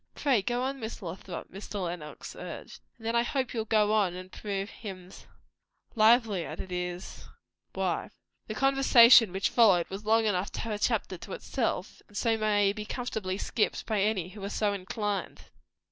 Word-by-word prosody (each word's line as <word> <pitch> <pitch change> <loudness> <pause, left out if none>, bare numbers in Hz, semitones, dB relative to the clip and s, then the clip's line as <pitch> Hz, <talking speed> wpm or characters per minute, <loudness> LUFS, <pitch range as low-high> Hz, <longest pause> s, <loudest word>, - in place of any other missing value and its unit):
"Pray 265 -7 +2
go 240 +5 -1
on, 270 +1 -2
Miss 220 -2 -6
Lothrop!" 180 +1 -7
Mr. 195 0 -5
Lenox 170 -3 -7
urged. - - -8 0.2
"And 225 - -14
then 230 +1 0
I 235 - +5
hope 260 +1 -2
you'll 225 -2 -2
go 215 -1 +3
on 200 -5 +2
and 185 +1 -9
prove 200 0 -4
hymns 185 -3 -10 0.7
lively," 220 -4 +4
added 185 - -7
his 180 0 -5 0.5
wife. - - -1 0.4
The 215 - -5
conversation 250 -5 +7
which 195 +2 0
followed 195 -8 +5
was 195 +2 -6
long 220 +1 +3
enough 195 -2 0
to - - -4
have 225 -1 -3
a 205 - -3
chapter 210 -6 0
to 195 - -8
itself; 225 -7 -3
and 205 - -10
so 230 -2 +2
may 205 -2 +2
be 210 0 -5
comfortably 210 -4 -3
skipped 210 +1 -1
by 215 -3 0
any 195 -4 0
who 200 +1 -10
are 200 - -3
so 210 -1 0
inclined. 200 +1 -3
210 Hz, 175 wpm, -29 LUFS, 190-225 Hz, 0.7 s, conversation